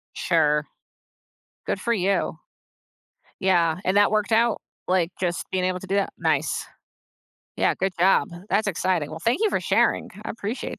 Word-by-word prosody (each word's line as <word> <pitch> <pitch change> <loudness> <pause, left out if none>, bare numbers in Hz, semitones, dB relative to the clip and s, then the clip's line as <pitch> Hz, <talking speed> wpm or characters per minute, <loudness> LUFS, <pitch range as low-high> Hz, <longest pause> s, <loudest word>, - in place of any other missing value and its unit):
Sure. 150 0 +2 1.0
Good - - -2
for 235 - 0
you. 195 -1 0 1.1
Yeah, 170 -4 +3
and 185 +2 +1
that 205 0 +5
worked 215 0 0
out, 230 +1 +3 0.3
like, 180 -2 +1
just 175 -2 -1
being 185 -1 0
able 185 0 -1
to 190 - -10
do 195 - 0
that. 200 - +1
Nice. 155 -2 0 0.9
Yeah, - - +2
good 190 0 -1
job. 190 +3 +4 0.2
That's 205 +3 +1
exciting. 180 -5 0
Well, 160 - -6
thank 235 - 0
you 435 - +3
for - - 0
sharing. - - +2 0.2
I - - -4
appreciate 220 +1 -5
185 Hz, 160 wpm, -24 LUFS, 170-205 Hz, 1.1 s, that